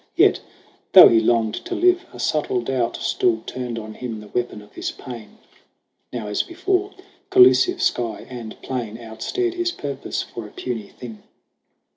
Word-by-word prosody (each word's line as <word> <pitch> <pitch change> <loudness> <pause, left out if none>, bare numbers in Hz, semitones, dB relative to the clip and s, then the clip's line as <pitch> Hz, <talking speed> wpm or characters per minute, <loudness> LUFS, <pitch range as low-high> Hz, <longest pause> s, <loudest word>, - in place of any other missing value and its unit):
Yet, - - +5 0.5
though - - +11
he 115 - +5
longed 110 -1 +2
to - - -3
live, 360 +1 +3
a - - -12
subtle 145 -5 0
doubt 120 -1 -1
Still 110 -2 +1
turned 125 -2 -5
on 110 -1 -7
him 115 -1 -6
the 105 0 -12
weapon 120 -3 -3
of 105 - -20
his - - -3
pain: 115 -6 -10 0.7
Now, 120 -3 -4
as 105 0 0
before, 375 +3 -1 0.4
collusive 375 -1 +5
sky 115 -2 -1
and 120 -3 -8
plain 120 -4 -4
Outstared 120 - -3
his 350 -1 -1
purpose 140 - -4
for 115 -3 -8
a - - -15
puny 115 -5 -5
thing. 115 -4 -11
120 Hz, 160 wpm, -22 LUFS, 110-155 Hz, 0.7 s, though